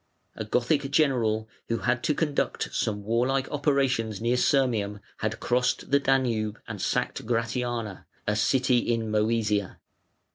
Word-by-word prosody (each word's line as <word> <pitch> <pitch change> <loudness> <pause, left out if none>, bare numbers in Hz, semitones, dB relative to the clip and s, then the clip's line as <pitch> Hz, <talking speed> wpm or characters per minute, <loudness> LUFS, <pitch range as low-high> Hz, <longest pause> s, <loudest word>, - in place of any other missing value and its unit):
A - - -4
Gothic 130 +6 +1
general 120 -7 +2 0.2
who 115 - 0
had 120 -1 +2
to 150 - +2
conduct 150 -3 -1
some 105 -2 -1
warlike 125 +5 +1
operations 135 -7 +1
near 120 +2 +1
Sirmium 115 -6 +1 0.2
had 110 0 -2
crossed 125 +2 0
the 140 - +5
Danube 120 -6 +1
and - - -6
sacked - - -1
Gratiana, 115 -2 -2 0.2
a 105 - +1
city 130 +3 +3
in 115 -2 -1
Mœsia. 105 -2 +1
120 Hz, 135 wpm, -27 LUFS, 110-135 Hz, 0.2 s, the